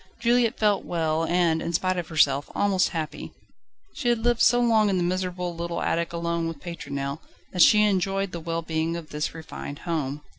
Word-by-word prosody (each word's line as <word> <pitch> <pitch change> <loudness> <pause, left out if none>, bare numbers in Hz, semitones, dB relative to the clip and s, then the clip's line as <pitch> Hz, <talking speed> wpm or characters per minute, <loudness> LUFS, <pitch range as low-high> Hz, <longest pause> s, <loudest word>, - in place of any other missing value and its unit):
Juliette 235 -1 +2
felt 210 -2 +2
well 165 -1 -1
and, 170 -2 +2
in 170 - -3
spite 185 +2 +1
of 170 - -5
herself, 145 -3 +2
almost 195 -2 +2
happy. 160 -4 -5 0.6
She 245 - -1
had 240 - +3
lived 240 -1 +2
so 245 +2 +5
long 225 -3 +3
in 190 - +1
the 180 - +1
miserable, 180 -1 -2
little 170 0 -3
attic 170 0 0
alone 170 0 -2
with 165 -2 -5
Pétronelle 140 -4 -5 0.3
that 180 - +1
she 210 +4 +7
enjoyed 195 -1 0
the 170 - -5
well 165 0 -3
being 160 +1 -1
of 165 -2 -8
this 150 +2 -3
refined 160 -3 -7
home. 150 -4 -2
170 Hz, 190 wpm, -25 LUFS, 160-195 Hz, 0.6 s, she